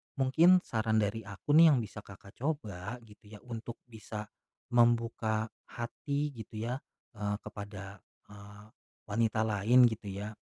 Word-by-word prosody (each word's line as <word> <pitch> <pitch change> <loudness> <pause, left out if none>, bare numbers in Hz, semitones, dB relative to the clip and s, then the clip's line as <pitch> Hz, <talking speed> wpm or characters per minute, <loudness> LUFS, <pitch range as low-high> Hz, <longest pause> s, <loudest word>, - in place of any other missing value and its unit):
mungkin 165 +7 +5
saran 110 -1 +1
dari 105 +2 -2
aku 100 +8 -4
nih 165 +1 +9
yang 130 - +3
bisa 105 -1 -8
Kakak, 100 -1 -13
coba 115 - -3
gitu 105 -1 -18
ya 105 -1 -12
untuk 120 -1 -6 0.2
bisa, 110 -1 -6 0.5
membuka 115 -2 +2 0.2
hati 140 +5 -3
gitu 110 0 -8
ya, 125 - -1 0.4
eee, 105 0 -1
kepada, 100 -1 -8 0.3
eee, 105 0 -12 0.5
wanita 110 +1 +1
lain 110 +4 +5
gitu 110 -2 -7
ya 105 +2 -5
110 Hz, 140 wpm, -31 LUFS, 105-120 Hz, 0.5 s, nih